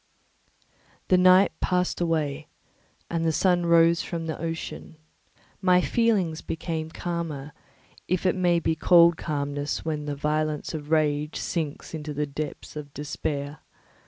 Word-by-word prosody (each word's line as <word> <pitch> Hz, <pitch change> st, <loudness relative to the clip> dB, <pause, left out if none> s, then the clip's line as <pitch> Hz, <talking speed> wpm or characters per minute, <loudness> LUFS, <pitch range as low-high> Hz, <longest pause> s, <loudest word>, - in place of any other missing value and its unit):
The 185 Hz, -, +5 dB
night 185 Hz, +2 st, +6 dB
passed 180 Hz, -1 st, 0 dB
away, 155 Hz, -3 st, -1 dB, 0.6 s
and 165 Hz, -1 st, -2 dB
the 165 Hz, -, +2 dB
sun 175 Hz, +1 st, +2 dB
rose 170 Hz, 0 st, +5 dB
from 165 Hz, -1 st, -4 dB
the 160 Hz, -, -3 dB
ocean; 165 Hz, -1 st, -5 dB, 0.6 s
my 180 Hz, -2 st, +5 dB
feelings 190 Hz, -6 st, +1 dB
became 160 Hz, -1 st, -4 dB
calmer, 160 Hz, -4 st, -4 dB, 0.6 s
if 185 Hz, +1 st, -1 dB
it 185 Hz, -, +4 dB
may 175 Hz, -2 st, +2 dB
be 160 Hz, -, 0 dB
called 170 Hz, +1 st, +6 dB
calmness 145 Hz, -2 st, -3 dB
when 150 Hz, -2 st, -2 dB
the 145 Hz, -1 st, -3 dB
violence 150 Hz, +2 st, -1 dB
of 150 Hz, -2 st, -6 dB
rage 150 Hz, -1 st, +1 dB
sinks 155 Hz, -3 st, -4 dB
into 150 Hz, -2 st, -5 dB
the 150 Hz, +1 st, 0 dB
depths 145 Hz, +2 st, -6 dB
of 145 Hz, -2 st, -7 dB
despair. 145 Hz, 0 st, -4 dB
160 Hz, 135 wpm, -26 LUFS, 150-170 Hz, 0.6 s, night